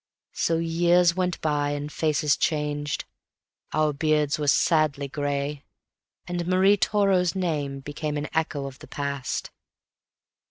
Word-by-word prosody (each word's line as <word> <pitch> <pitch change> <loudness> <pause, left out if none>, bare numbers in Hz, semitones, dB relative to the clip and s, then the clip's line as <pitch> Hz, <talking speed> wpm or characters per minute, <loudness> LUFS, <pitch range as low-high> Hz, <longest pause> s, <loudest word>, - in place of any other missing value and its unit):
So 165 - +1
years 170 +1 +3
went 180 -2 -1
by, 145 -2 0
and 145 +1 -4
faces 150 -2 +1
changed; 150 -1 -1 0.7
our 155 -1 +1
beards 150 0 +1
were 150 - -2
sadly 150 -2 +2
gray, 145 0 -3 0.6
And 175 -1 -3
Marie 190 +2 +5
Toro's 195 -3 +2
name 145 -7 -2
became 150 +1 -4
an 145 +1 -3
echo 155 -3 -1
of 135 -1 -8
the - - -12
past. 140 -2 -3
150 Hz, 125 wpm, -25 LUFS, 145-170 Hz, 0.7 s, Marie